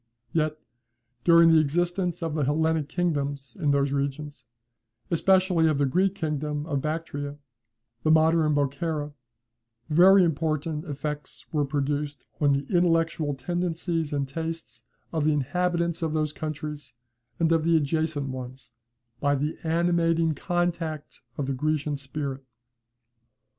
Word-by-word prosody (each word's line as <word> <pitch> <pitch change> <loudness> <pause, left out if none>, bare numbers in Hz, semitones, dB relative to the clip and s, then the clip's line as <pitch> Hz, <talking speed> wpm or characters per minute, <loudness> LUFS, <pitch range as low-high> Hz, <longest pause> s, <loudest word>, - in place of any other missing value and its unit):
Yet, 155 -1 +1 0.7
during 170 -1 +7
the 160 - +6
existence 175 +3 0
of 165 -2 -2
the 150 -2 0
Hellenic 155 +1 +1
kingdoms 145 -6 -2
in 150 -4 +1
these 140 0 +2
regions, 140 -2 -3 0.6
especially 180 -1 +3
of 155 -2 +2
the 145 - +2
Greek 185 +8 +1
kingdom 150 -3 -2
of 145 -4 -1
Bactria, 145 -2 -4 0.6
the 155 - 0
modern 160 -1 +4
Bokhara, 145 +1 -1 0.8
very 185 +5 +7
important 155 -1 -1
effects 150 -1 -5
were 150 -2 +2
produced 145 +1 -2
on 145 -2 +3
the 140 0 0
intellectual 165 -4 +2
tendencies 165 +2 -2
and 140 -2 -1
tastes 160 -6 -6 0.3
of 160 -2 0
the 155 0 +3
inhabitants 170 +4 0
of 160 -2 -1
those 155 -1 0
countries 150 -4 -6 0.4
and 165 -1 +2
of 165 -1 +3
the 165 0 +3
adjacent 155 -1 -1
ones, 130 -2 -7 0.5
by 145 0 +2
the 150 +3 -1
animating 165 -1 +2
contact 170 -1 -2 0.2
of 145 - -1
the 135 - -1
Grecian 150 +2 -1
spirit. 135 -1 -5
155 Hz, 130 wpm, -26 LUFS, 145-165 Hz, 0.8 s, during